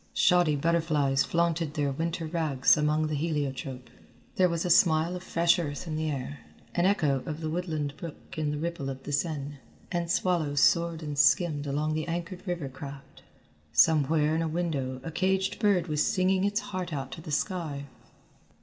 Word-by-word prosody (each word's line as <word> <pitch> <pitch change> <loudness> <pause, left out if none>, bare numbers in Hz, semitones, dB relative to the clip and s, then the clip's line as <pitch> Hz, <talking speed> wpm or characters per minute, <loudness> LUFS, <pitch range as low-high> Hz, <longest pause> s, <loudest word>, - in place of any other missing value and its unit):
Shoddy 175 -5 +4
butterflies 150 -3 +2
flaunted 165 -2 0
their 145 -2 0
winter 165 +3 -2
rags 155 -5 +3
among 150 +1 +1
the 155 - -2
heliotrope. 140 -4 -3 0.5
There 185 -1 +4
was 170 0 -2
a 180 - +1
smell 165 0 +4
of 180 - -6
fresh 170 -1 +2
earth 145 -2 -4
in 160 -2 -4
the 155 0 -1
air, 140 0 -4 0.3
an 175 +1 +2
echo 150 -9 +2
of 155 -1 -4
the 155 -1 -3
woodland 155 -4 -2
brook 165 -3 -9
in 155 -2 -1
the 150 - -2
ripple 160 -3 -3
of 135 0 -7
the - - -6
Seine, 145 -2 -2 0.3
and 170 -2 -1
swallows 170 -5 +1
soared 170 +1 +3
and 145 -2 -4
skimmed 150 -4 +3
among 150 +2 -1
the 155 +1 -2
anchored 175 +3 -5
river 175 -5 -2
craft. 140 +1 -10 0.5
Somewhere 150 - +4
in 160 - +1
a 165 - 0
window 150 -6 -2
a 165 - -5
caged 190 +3 0
bird 200 -6 +3
was 150 -3 0
singing 190 -1 +2
its 205 +3 0
heart 185 -5 -5
out 135 -3 -4
to 160 - -7
the 155 - -9
sky. 155 -4 -2
160 Hz, 180 wpm, -28 LUFS, 145-170 Hz, 0.5 s, Shoddy